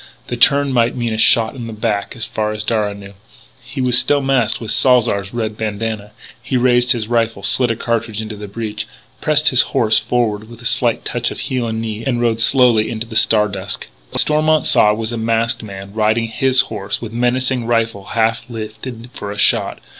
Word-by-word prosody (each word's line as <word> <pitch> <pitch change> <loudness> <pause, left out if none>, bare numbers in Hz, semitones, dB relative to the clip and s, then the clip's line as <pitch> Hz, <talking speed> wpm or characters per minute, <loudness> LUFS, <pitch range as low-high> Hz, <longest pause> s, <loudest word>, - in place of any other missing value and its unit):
To 120 - -2
turn 140 +3 +3
might 120 -1 +2
mean 120 -2 -2
a - - -3
shot 115 0 +4
in 120 -3 -7
the 115 - -7
back 105 -1 -2
as 115 - -4
far 105 0 -3
as 105 0 -4
Darragh 105 -2 -1
knew. 100 0 -12 0.5
He 135 - -6
was 125 -1 +4
still 145 - +2
masked 135 -5 +1
with 115 - -4
Salzar's 120 -6 +2
red 110 -2 -3
bandanna. 110 -1 -4 0.3
He 125 +3 -2
raised 125 0 +3
his 115 -3 -4
rifle, 115 -3 -1
slid 120 +5 +3
a 115 - 0
cartridge 115 -2 -2
into 110 -1 -5
the 105 0 -8
breech, 105 0 -5 0.3
pressed 155 0 +3
his 130 - +5 0.2
horse 110 -2 +3
forward 110 -2 -2
with 120 -1 -12
a 120 - -13
slight 120 -1 +1
touch 120 0 -2
of - - -7
heel 125 -3 -2
and 110 0 -3
knee, 110 0 -5
and 125 -3 -1
rode 115 -2 0
slowly 115 -2 +4
out 115 - -4
into 110 +1 -4
the 115 -1 -10
star 110 -1 +4
dusk. 100 0 -5 0.2
What - - +4
Stormont 155 0 +2
saw 105 - +4
was 110 +1 -3
a 120 - -3
masked 115 0 0
man, 100 -2 -9
riding 110 +1 +1
his 130 +2 +3
own - - -14
horse, 100 -2 -4
with 115 -1 -8
menacing 125 0 0
rifle 115 -4 0
half 115 0 0
lifted 115 +2 -8
for 100 - -6
a 100 - -7
shot! - - +2
115 Hz, 215 wpm, -17 LUFS, 110-120 Hz, 0.5 s, his